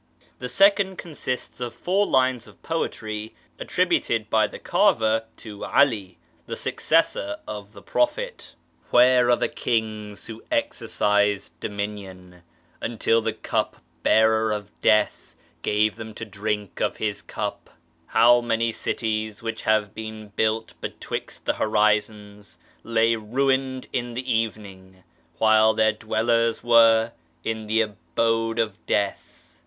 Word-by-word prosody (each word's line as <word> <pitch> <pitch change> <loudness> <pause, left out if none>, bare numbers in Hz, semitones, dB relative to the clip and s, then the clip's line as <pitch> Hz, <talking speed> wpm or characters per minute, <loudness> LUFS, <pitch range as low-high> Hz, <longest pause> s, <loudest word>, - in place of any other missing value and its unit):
The 125 - -4
second 195 +1 +4
consists 135 -8 -5
of 120 -1 -5
four 195 +3 +1
lines 130 -2 +2
of - - -18
poetry, 110 -9 -4 0.2
attributed - - 0
by - - +4
the - - -9
carver 110 0 +2
to 105 -2 -9
'Ali, 105 -10 +2 0.3
the - - -4
successor 100 +1 0
of 105 -1 -7
the 100 - -13
Prophet: 485 +12 -1
— - - -40
" - - -33
TFliere 125 0 +5
are - - +6
the - - 0
kings 110 -3 -3
who 115 0 -9
exercised 105 -1 0
dominion 95 -4 -6 0.4
Until 115 0 +1
the 115 0 -1
cup 110 - -2 0.2
bearer 110 0 +3
of 105 -1 -4
Death 110 -1 +2 0.3
gave 105 +1 +1
them 110 -1 -8
to 110 - -6
drinlc 105 -1 -4
of - - 0
his 105 -2 -2
cup? - - -5 0.4
How 120 +2 +5
many 115 -1 0
cities 110 -1 -3
xchich 115 0 -4
have 110 -2 +1
been 110 -1 -8
built 110 +2 -1
bettvixt - - -6
the - - +1
horizons 105 -1 0 0.3
Lay 115 0 +2
ruined 130 +3 0
in 120 -2 -2
the 130 +1 -4
evening, 95 -4 -4 0.4
xchile 110 0 +5
their 110 -1 +4
dwellers 115 +1 0
were 115 -1 +5 0.3
in 110 -1 -3
the 110 +1 +3
abode 115 +4 -1
of 110 -3 -2
death?" 100 -1 0
110 Hz, 130 wpm, -24 LUFS, 105-115 Hz, 0.4 s, are